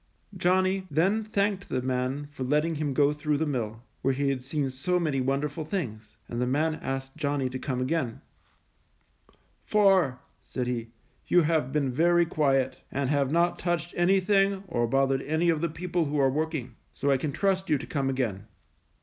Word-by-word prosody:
Johnny 185 +1 +1
then 190 +9 +2
thanked 200 -2 -1
the 130 - 0
man 130 +3 -1
for 135 -2 -5
letting 150 +5 +1
him 150 -2 -2
go 145 +2 +3
through 150 0 -1
the 160 - 0
mill, 115 -5 -3 0.2
where 135 0 +1
he 140 +1 +1
had 130 -2 -2
seen 140 0 -2
so 180 +8 0
many 150 -6 0
wonderful 140 +4 -1
things, 115 - -5
and 120 +1 -3
the 125 - +1
man 155 +5 +1
asked 135 0 -4
Johnny 145 -4 -1
to 130 - -4
come 130 -2 -2
again, 130 -3 -1 1.4
"For," 190 -11 +3 0.2
said 125 - -4
he, 120 -2 -2 0.4
"you 175 - +5
have 155 -4 +1
been 140 -3 0
very 170 +5 +4
quiet, 135 -5 +1
and 140 0 -1
have 140 -2 +1
not 170 +2 +2
touched 175 -1 -1
anything 195 +2 +3
or 120 -9 0
bothered 135 +2 +2
any 160 +4 +1
of 160 -2 +1
the 170 - 0
people 170 +1 -1
who 150 +1 -2
are 135 -1 +4
working; 150 -5 -3 0.2
so 140 - +1
I 135 - +4
can 145 +2 -2
trust 190 +4 0
you 150 - +4
to 140 - -7
come 135 -3 -1
again." 110 -6 -2
145 Hz, 185 wpm, -27 LUFS, 130-170 Hz, 1.4 s, you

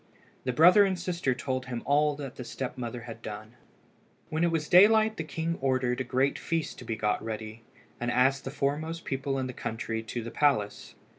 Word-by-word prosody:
The - - +1
brother 180 +10 +7
and 190 -2 +1
sister 175 -7 -1
told 130 0 -3
him 120 -2 -4
all 145 +1 +3
that 140 -3 -7
the 125 - -6
step 125 +1 -5
mother 120 -1 -5
had 115 -1 -9
done. 110 +1 -8 0.8
When 160 +2 0
it 170 - +4
was 160 -2 -1
daylight 220 +4 +6
the 165 - -2
king 165 +2 -3
ordered 130 -2 +1
a - - 0
great 130 +2 0
feast 165 -2 -2
to 125 - -10
be 115 - -2
got 105 -1 0
ready, 110 0 -6 0.4
and 120 - -1
asked 130 +2 +3
the - - -4
foremost 155 +4 -2
people 135 0 -2
in 130 - -1
the 130 - -5
country 115 -1 -4
to 115 +1 -5
the 115 - -6
palace. 135 -9 0
135 Hz, 205 wpm, -28 LUFS, 120-160 Hz, 0.8 s, brother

